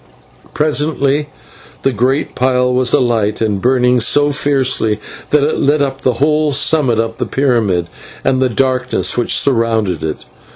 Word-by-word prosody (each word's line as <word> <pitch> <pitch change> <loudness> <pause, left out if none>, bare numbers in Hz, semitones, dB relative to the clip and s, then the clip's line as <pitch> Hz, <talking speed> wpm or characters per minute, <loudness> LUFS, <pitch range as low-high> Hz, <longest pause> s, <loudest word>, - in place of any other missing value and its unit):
Presently 150 -1 0 0.5
the 135 - +2
great 130 +5 -1
pile 125 0 +1
was 125 -1 +1
alight 110 -4 +1
and 105 -3 -1
burning 125 0 +2
so 145 +6 +2
fiercely 135 -7 0 0.3
that 150 -1 +2
it 150 - 0
lit 145 +2 +2
up 135 -1 -2
the 130 - +1
whole 150 +1 +1
summit 140 -4 +2
of 115 0 -2
the - - -3
pyramid 115 -10 0 0.4
and 130 -1 +1
the 130 - +2
darkness 130 +2 0
which 120 - +1
surrounded 115 - 0
it. 80 -1 -5
130 Hz, 150 wpm, -15 LUFS, 115-140 Hz, 0.5 s, the